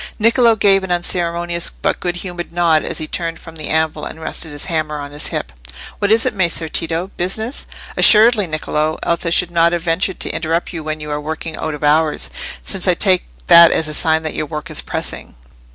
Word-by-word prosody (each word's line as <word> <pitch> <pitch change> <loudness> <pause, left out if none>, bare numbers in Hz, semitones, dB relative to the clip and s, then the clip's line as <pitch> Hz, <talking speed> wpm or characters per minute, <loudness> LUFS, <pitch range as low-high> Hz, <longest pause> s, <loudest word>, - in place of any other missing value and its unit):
Niccolò 230 +1 +4
gave 195 -2 +3
an 190 - -5
unceremonious 175 -1 -1
but - - -3
good 175 -1 -2
humoured 175 -1 -6
nod 170 -2 +2
as - - -3
he 155 - -1
turned 165 +1 -3
from 165 -1 -13
the 155 -2 -4
anvil 160 0 0
and 160 - -7
rested 160 0 -3
his 145 -1 -5
hammer 155 -3 -2
on 145 -1 -7
his 145 +1 -2
hip. 65 - -4 0.5
"What 205 0 +1
is 225 +2 +4
it, 255 - 0
Messer 170 -4 0
Tito? 165 +4 -2
Business?" 220 +8 -1 0.3
"Assuredly, 215 -2 +6
Niccolò; 155 0 -2
else 170 0 0
I - - +2
should 175 +1 +1
not 170 0 +3
have 170 -1 -2
ventured 175 +2 -1
to - - 0
interrupt 165 +3 -2
you 165 -2 -5
when 155 0 -4
you 150 0 -6
are 145 0 -3
working 160 +1 -5
out 155 -1 -4
of 150 - -10
hours, 150 - +1 0.3
since - - 0
I - - +4
take - - +2 0.2
that 170 - +8
as 160 - +1
a 150 - -4
sign 160 +1 +2
that 155 - -4
your 155 - -3
work 150 -1 -6
is - - -3
pressing." - - -5
165 Hz, 215 wpm, -17 LUFS, 155-175 Hz, 0.5 s, that